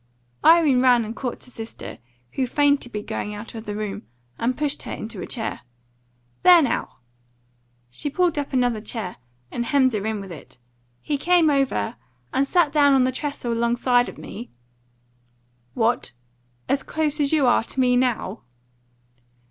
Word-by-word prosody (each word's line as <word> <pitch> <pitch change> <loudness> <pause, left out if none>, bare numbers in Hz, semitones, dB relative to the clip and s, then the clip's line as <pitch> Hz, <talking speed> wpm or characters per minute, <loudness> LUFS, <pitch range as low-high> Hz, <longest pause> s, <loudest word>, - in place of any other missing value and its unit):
Irene 315 -6 +6
ran 245 -3 +4
and 225 +2 -6
caught 250 -3 -5
her 250 - -14
sister, 225 -2 -8 0.3
who 260 -2 -1
feigned 285 +2 +3
to 245 - -5
be 210 -2 -5
going 210 0 -4
out 210 +2 -9
of 225 -1 -8
the 205 - -3
room, 210 - -5 0.3
and 245 +2 0
pushed 295 -2 -1
her - - -6
into 220 - -6
a - - -5
chair. 225 -3 -3 0.8
"There, 360 -1 +8
now!" 260 - -2 0.9
She 205 - -4
pulled 340 +1 +1
up 285 - -4
another 245 -4 +1
chair, 210 -4 -5 0.3
and 240 - -2
hemmed 260 0 +3
her 210 -2 -1
in 220 -1 -2
with 195 -2 -8
it. 155 - -12 0.5
"He 290 -2 -1
came 340 -1 +4
over, 270 -4 0 0.4
and 275 +1 +2
sat 335 -1 +3
down 285 -2 +5
on 265 -1 +5
the 255 - +2
trestle 270 -3 -3
alongside 240 +1 +2
of - - -11
me 235 +4 -8 0.7
" 120 0 -41
"What? 230 - +1 0.5
As 275 - +1
close 305 -1 -1
as 285 -1 +2
you 305 -4 +3
are 240 -2 +4
to 265 - -6
me 250 -1 +4
now?" 245 -5 0
250 Hz, 170 wpm, -23 LUFS, 220-285 Hz, 0.9 s, There